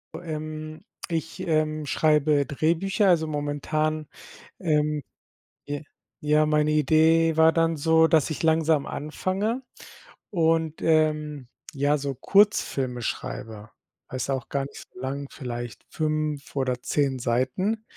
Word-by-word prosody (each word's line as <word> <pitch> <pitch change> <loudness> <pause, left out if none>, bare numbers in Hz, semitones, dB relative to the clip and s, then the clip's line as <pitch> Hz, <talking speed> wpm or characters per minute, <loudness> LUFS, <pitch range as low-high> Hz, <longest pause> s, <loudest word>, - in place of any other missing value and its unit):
Ähm, 155 0 -6 0.3
ich, 165 -1 -3
ähm, 155 -1 +1
ich 145 - -6
schreibe 150 -2 +3
Drehbücher, 170 +7 +1
also, 160 -3 +3
momentan 155 +1 -2 0.5
ähm, 150 -3 +1 0.7
ja 145 0 -3 0.4
ja, 150 +1 +3
meine 150 0 +2
Idee 160 +2 +4
war 160 0 +6
dann 165 -1 +2
so, 160 +2 +4
dass 160 -2 +3
ich 155 - -4
langsam 160 -2 +2
anfange 195 - -2 0.7
und, 165 -3 +1
ähm, 150 -4 +1 0.3
ja, 145 +2 +2
so 140 -1 -3
Kurzfilme 135 - +2
schreibe. 110 -1 -5 0.4
Weißt 130 +1 -3
du - - +2
auch 130 - -5
gar 140 -1 -1
nicht - - -11
so 185 - -12
lang, 140 +1 -4
vielleicht 120 -6 -6
5 155 -2 -2
oder 130 -2 0
10 140 -3 0
Seiten. 130 - 0
155 Hz, 125 wpm, -25 LUFS, 140-160 Hz, 0.7 s, war